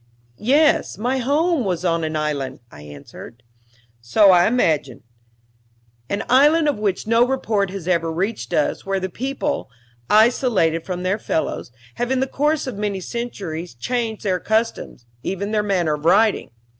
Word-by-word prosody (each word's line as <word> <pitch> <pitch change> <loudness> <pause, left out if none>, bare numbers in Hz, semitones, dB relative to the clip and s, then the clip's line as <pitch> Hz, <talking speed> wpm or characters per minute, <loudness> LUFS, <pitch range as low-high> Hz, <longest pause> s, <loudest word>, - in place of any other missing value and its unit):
"Yes, 290 +7 +2
my 250 +5 -1
home 295 +4 +1
was 180 -3 -2
on 165 -1 +1
an 155 0 -3
island," 150 -3 -2
I 75 - -13
answered. 75 +10 -12 0.6
"So 195 - +5
I 175 -1 +5
imagined. 155 - 0 1.1
An 200 +2 -2
island 300 +5 +4
of 285 -7 0
which 200 -3 -1
no 230 +2 +4
report 220 -7 0
has 185 -3 -7
ever 170 -2 +1
reached 175 - -3
us, 150 - 0
where 195 0 -1
the 190 0 -3
people, 275 +8 -3 0.4
isolated 215 -7 +3
from 180 -1 -4
their 190 +4 0
fellows, 160 -10 -3 0.3
have 245 - -1
in 265 0 +1
the 265 - +1
course 295 +3 0
of 250 -6 -6
many 205 -2 -2
centuries 180 - -5
changed 225 - -3
their 185 -3 0
customs 220 - -2 0.2
even 200 +6 -3
their 215 -1 +2
manner 185 -6 0
of 150 0 -5
writing. 205 +5 +3
200 Hz, 155 wpm, -21 LUFS, 165-245 Hz, 1.1 s, So